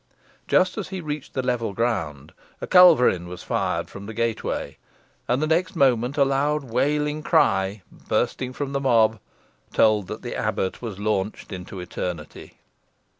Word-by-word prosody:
Just 185 +4 +2
as 205 - -4
he 190 -1 -5
reached 150 -4 -6
the 130 - -1
level 115 -4 -1
ground, 85 - -2 0.3
a - - -4
culverin 145 - +6
was 90 0 -8
fired - - -1
from 100 0 -10
the 110 - -7
gateway, 115 -1 -2 0.5
and 125 +5 +1
the - - +3
next 175 +5 0
moment 130 -2 +2
a 140 - +5
loud 140 +2 +1
wailing 150 +5 0
cry 95 -7 +2
bursting 130 -1 -2
from 140 +1 -4
the 140 - -1
mob 115 -4 +3 0.5
told 105 -3 +3
that - - -7
the - - -5
abbot 95 - -2
was 110 -6 -6
launched 105 0 -2
into 95 +1 -7
eternity. 90 -3 -6
120 Hz, 155 wpm, -24 LUFS, 100-145 Hz, 0.5 s, culverin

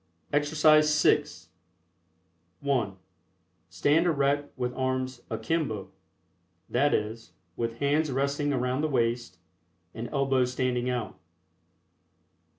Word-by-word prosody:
EXERCISE 150 +1 +4
VI. - - +4 1.4
(1) 125 -9 0 0.7
Stand 145 - +2
erect 145 -2 +1
with 125 -1 -2
arms 130 -1 -2
"akimbo," 110 -2 -2 0.8
that 145 +4 +2
is, 110 +2 -2 0.2
with 115 0 -3
hands 145 +2 +1
resting 140 +2 0
around 125 +1 0
the 155 - +1
waist 120 -6 -1 0.6
and 115 +1 -6
elbows 135 -3 +1
standing 125 -1 0
out. 125 -2 -3
130 Hz, 95 wpm, -28 LUFS, 120-145 Hz, 1.4 s, EXERCISE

